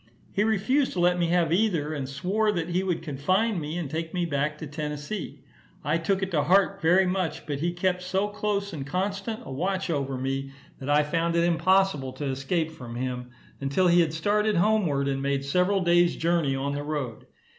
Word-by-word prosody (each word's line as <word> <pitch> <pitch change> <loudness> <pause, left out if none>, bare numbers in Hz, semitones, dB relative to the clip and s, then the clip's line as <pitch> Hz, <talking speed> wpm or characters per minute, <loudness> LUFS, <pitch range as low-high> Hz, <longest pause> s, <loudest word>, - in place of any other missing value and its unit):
He 205 - +1
refused 220 +6 +1
to 180 - -3
let 180 0 +3
me 170 - +2
have 170 -1 +2
either, 170 -7 +1
and 135 -3 -4
swore 195 +10 0
that 170 -2 -2
he 175 +2 +1
would 180 -4 -2
confine 185 +8 0
me, 155 +2 -4
and 170 -4 -3
take 160 +4 -4
me 175 -1 +1
back 150 -1 -1
to 160 - -6
Tennessee. 150 +5 -5 0.4
I 155 +3 +1
took 190 +3 0
it 190 - -3
to 155 -4 +2
heart 195 +3 +3
very 180 +4 +4
much, 180 -4 -2
but 145 -3 -3
he 170 +3 0
kept 180 +1 0
so 190 +2 0
close 205 -1 -2
and 145 -4 -4
constant 195 - -3
a - - -8
watch 185 +6 -1
over 135 -3 -1
me, 135 +1 -3 0.3
that 135 - -6
I 150 +1 +4
found 165 +2 0
it 170 - +3
impossible 170 -5 +2
to 145 - -5
escape 140 +5 -1
from 125 -7 -9
him, 125 0 -4 0.3
until 140 +7 +1
he 175 0 +6
had 160 -2 +1
started 210 +6 +1
homeward, 175 -8 +2
and 135 -1 -1
made 140 0 -1
several 180 +6 +2
days' 175 0 +4
journey 165 -5 +1
on 140 +1 -2
the 145 - -3
road. 145 -6 -4
170 Hz, 205 wpm, -26 LUFS, 145-190 Hz, 0.4 s, he